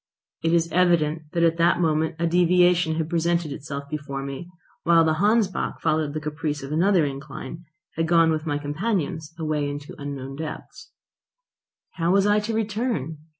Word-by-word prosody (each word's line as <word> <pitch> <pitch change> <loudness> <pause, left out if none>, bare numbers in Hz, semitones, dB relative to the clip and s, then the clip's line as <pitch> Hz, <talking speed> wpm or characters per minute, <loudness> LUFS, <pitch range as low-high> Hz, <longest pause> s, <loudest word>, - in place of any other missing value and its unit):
It 165 - +2
is 165 -1 +3
evident 165 -3 +2
that 170 -1 +1
at 165 0 +3
that 170 +1 +3
moment 160 -1 +1
a 170 - 0
deviation 175 -1 +3
had 160 -1 -1
presented 170 -1 0
itself 140 0 -5
before 140 -2 -5
me, 140 +5 -6 0.3
whilst 165 -1 +5
the 160 +3 +1
Hansbach, 210 -2 +1
following 155 -2 0
the 155 - -2
caprice 150 -1 -3
of 135 - -7
another 175 +1 +3
incline, 140 +3 -7 0.3
had 165 0 +1
gone 165 -1 +4
with 155 0 -2
my 145 -1 0
companions 160 +1 -2
away 155 -3 -1
into 145 +1 -7
unknown 135 -1 -6
depths. 155 0 -8 1.1
How 165 0 +1
was 195 +1 +4
I 205 0 +4
to 220 +1 -3
return? 210 - -2
160 Hz, 165 wpm, -24 LUFS, 150-175 Hz, 1.1 s, whilst